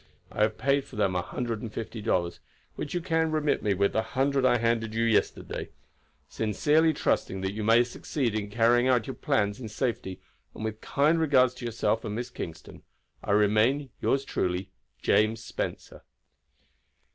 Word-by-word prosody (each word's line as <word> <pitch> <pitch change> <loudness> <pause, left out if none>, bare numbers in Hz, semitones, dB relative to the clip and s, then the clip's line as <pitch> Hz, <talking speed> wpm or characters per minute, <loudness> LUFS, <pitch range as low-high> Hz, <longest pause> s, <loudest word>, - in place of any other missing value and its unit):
I - - -3
have 110 0 +2
paid 140 +1 +2
for - - -14
them 100 -3 +1
a 90 - +1
hundred 115 +3 -4
and 115 - -6
fifty 110 0 -6
dollars, 85 -5 0 0.4
which 150 +3 -5
you 175 - 0
can 165 -2 +1
remit 155 -1 +1
me 105 -2 +1
with 100 +1 +1
the 110 - +2
hundred 135 +3 0
I 120 -1 +4
handed 115 -1 0
you 115 - +1
yesterday. 115 -2 0 0.6
Sincerely 150 +9 +2
trusting 95 -9 -1
that 95 0 -1
you 110 +1 -4
may 115 +3 +5
succeed 120 0 -3
in 105 -1 -3
carrying 120 +3 +3
out 125 -4 +3
your 135 - -5
plans 105 -7 0
in 110 - -6
safety, 105 -5 -3 0.4
and 110 - -5
with 110 0 -4
kind 150 +4 +2
regards 130 -5 +4
to 125 -1 -8
yourself 115 -1 0
and 105 - -4
Miss 120 +2 -4
Kingston, 80 -7 -8 0.4
"I - - 0
remain, 110 +7 +3
yours 135 0 +1
truly, 90 -4 -2 0.3
"James 110 +1 +2
Spencer." - - -5
115 Hz, 175 wpm, -28 LUFS, 105-135 Hz, 0.6 s, may